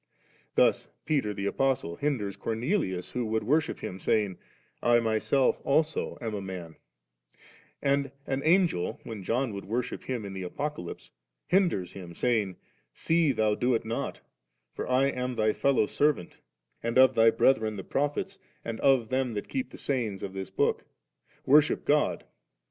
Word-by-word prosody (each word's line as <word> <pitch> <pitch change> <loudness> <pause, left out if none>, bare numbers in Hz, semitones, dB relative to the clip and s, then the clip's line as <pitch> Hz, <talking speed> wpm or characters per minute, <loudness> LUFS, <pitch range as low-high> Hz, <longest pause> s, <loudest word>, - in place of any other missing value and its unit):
Thus - - +3 0.2
Peter 135 -9 +1
the 100 -1 -4
Apostle 125 -6 0
hinders 110 -6 -1
Cornelius 110 - -2
who 125 - -2
would 110 0 0
worship 150 +7 +1
him, 95 - -5
saying, 100 -2 0 0.2
' - - -40
I 120 0 +4
myself 115 +4 +1
also 155 +3 +1
am 115 -2 -4
a 100 - -3
num 90 -4 -7
V - - -39 0.4
And 140 0 +1
an 135 0 -1
Angel, 170 - +2
when 110 -3 -7
John 115 +4 -1
would 100 -1 -6
worship 115 +5 -3
him 125 -5 -3
in 100 - -6
the 95 - -5
Apocalypse, 90 - -5 0.3
hinders 175 - +1
him, 90 -3 -9
saying, 110 -6 +1 0.4
'See 165 -2 +2
thou 110 -3 +2
do 125 +3 +1
it 115 - -2
not; 115 +1 -3 0.5
for - - -5
I 130 +2 +4
am 125 -2 -2
thy 110 -1 +2
fellow 140 -5 +2
servant, 145 - 0 0.4
and 115 +2 -1
of 130 0 +7
thy 115 -1 +6
brethren 110 -3 +2
the 95 - -6
Prophets, 145 - -2 0.3
and 115 -1 -4
of 130 -5 +3
theni 130 -3 0
that 105 - -4
keep 260 -2 -2
the - - -11
sayings 115 -8 -2
of 95 - -5
this 95 -1 -5
book: - - 0 0.6
worship 150 +2 +4
God'.' 150 +1 +2
115 Hz, 165 wpm, -28 LUFS, 100-140 Hz, 0.6 s, of